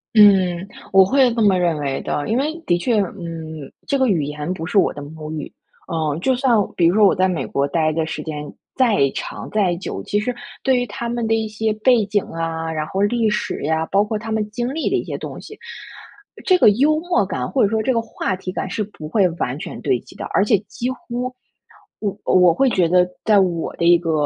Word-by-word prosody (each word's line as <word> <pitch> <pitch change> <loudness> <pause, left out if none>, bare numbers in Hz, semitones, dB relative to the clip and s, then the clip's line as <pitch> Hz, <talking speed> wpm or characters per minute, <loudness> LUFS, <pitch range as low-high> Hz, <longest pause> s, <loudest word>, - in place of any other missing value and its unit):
嗯， 190 -4 +5 0.3
我 195 - +8
会 260 +1 +3
这 230 - 0
么 195 -4 +4
认 170 -3 +1
为 140 -2 -2
的， 145 - -3
因 225 - +1
为 305 +4 -1
的 175 - +2
确， 230 +6 0
嗯， 165 -6 -6
这 275 - 0
个 260 - +3
语 170 -8 +1
言 150 +3 -4
不 165 -3 -6
是 180 - -1
我 195 - +4
的 145 - -8
母 155 +1 -8
语， 155 -3 -6 0.4
呃， 155 -4 -1
就 260 +7 +1
算 250 -2 +2 0.2
比 170 - +2
如 180 - +2
说 215 -1 +6
我 - - +5
在 185 +1 +2
美 180 -3 -2
国 140 0 -1
待 155 +1 +1
的 160 0 -1
时 160 - -5
间 150 -2 -6 0.2
再 240 -6 +3 0.2
长、 - - -6
再 195 -5 +1
久， 170 - -5
其 205 - 0
实 245 +4 -2 0.3
对 265 -1 +3
于 245 -1 -1
他 235 +3 -5
们 235 -1 -2
的 225 - +2
一 220 -1 -1
些 215 0 -1
背 220 0 +3
景 205 -1 0
啊， 165 0 -4
然 155 -1 -3
后 195 - -2
历 220 +2 +2
史 210 - -2
呀， 160 +2 0
包 200 +1 +3
括 215 +1 -3
他 220 +1 -7
们 215 -1 -1
经 240 +5 -3
历 320 - -1
的 - - 0
一 - - 0
些 - - -5
东 - - -7
西， 430 - -11 0.9
这 370 -1 +5
个 215 - +6
幽 290 +8 +3
默 355 +1 +1
感 - - -3
或 270 - +1
者 200 - +4
说 220 -1 0
这 260 - +1
个 230 - +1
话 205 -4 -3
题 185 0 -6
感， - - -4
是 215 - -2
不 155 -7 -10
会 200 -2 +3
完 145 -4 -3
全 - - -7
对 130 -5 +1
齐 - - -17
的。 - - -6
而 200 - +4
且 210 -1 +4
几 245 - -3
乎， 250 0 -5 0.7
我 205 -2 -2
我 180 -2 +5
会 265 +9 +2
觉 180 -6 +2
得 180 +1 +4 0.2
在 210 -2 +5
我 175 -4 -1
的 - - -2
一 175 0 +7
个， 165 -1 -2
195 Hz, 255 characters per minute, -20 LUFS, 165-230 Hz, 0.9 s, 我